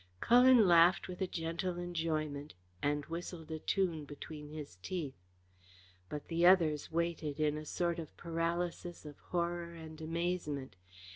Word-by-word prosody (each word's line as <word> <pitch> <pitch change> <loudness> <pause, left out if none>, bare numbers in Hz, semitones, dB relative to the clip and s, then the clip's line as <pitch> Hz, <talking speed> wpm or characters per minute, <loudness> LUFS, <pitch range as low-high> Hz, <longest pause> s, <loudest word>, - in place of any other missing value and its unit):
Cullen 245 - +7
laughed 170 +1 +6
with 180 +1 -7
a 190 - +1
gentle 175 +1 -2
enjoyment 155 - -2 0.3
and 145 0 0
whistled 165 -1 -6
a 160 - -3
tune 170 -3 0
between 150 +1 -8
his 150 -11 -8
teeth. 155 - -3 1.0
But 150 - -5
the 170 0 0
others 165 -5 +5
waited 165 -3 -1
in 150 -1 +2
a 155 0 -5
sort 170 +2 -1
of 160 -3 -8
paralysis 170 0 -2
of 145 -1 -10
horror 170 -1 -1
and 160 -1 -9
amazement. 160 - -2
165 Hz, 140 wpm, -34 LUFS, 150-175 Hz, 1.0 s, Cullen